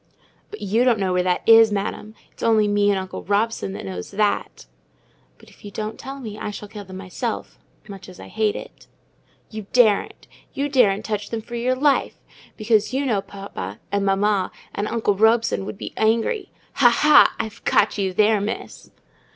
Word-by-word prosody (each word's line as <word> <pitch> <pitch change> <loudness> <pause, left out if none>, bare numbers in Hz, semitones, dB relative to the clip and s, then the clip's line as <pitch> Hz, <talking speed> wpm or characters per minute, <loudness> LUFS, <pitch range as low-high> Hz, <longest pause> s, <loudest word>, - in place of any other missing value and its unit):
"But 425 - -10
you 215 +5 +1
don't 245 -3 +3
know 190 -2 -1
where 180 - +2
that 180 0 0
is, 225 -1 +7
Madam: 210 +1 -4 0.2
it's - - -18
only 220 -2 +3
me 205 0 +2
and 200 - +2
uncle 190 0 -5
Robson 205 0 -1
that - - -7
knows 90 -2 -6
that." 210 0 -1 0.7
"But - - -19
if - - -22
you 205 - -8
don't 215 +2 -6
tell 270 +1 -7
me, 215 -5 -8
I - - -4
shall 210 0 -8
kill 205 -1 -9
them 185 0 -9
myself—much 195 0 -7
as 180 - -13
I - - -10
hate 215 -1 0
it." - - -10 0.6
"You 215 -2 -7
daren't. 225 -5 +2 0.3
You 285 +1 -1
daren't 220 -7 +3
touch 210 -1 -3
them 225 -1 -4
for 240 - -12
your 245 +2 0
life! 280 +1 +1 0.4
because 215 +1 +1
you 280 +1 0
know 215 -7 +1
papa 195 - -8
and 200 0 0
mamma, 195 0 +1 0.2
and 205 - -2
uncle 220 -3 0
Robson, 220 0 +2
would - - -6
be - - -7
angry. 230 - 0 0.3
Ha, 250 -3 +7
ha! 300 +5 +5
I've 220 0 -5
caught 210 0 +2
you 190 -1 0
there, 210 +2 +3
Miss!" 210 +3 -6
210 Hz, 185 wpm, -22 LUFS, 200-230 Hz, 0.7 s, is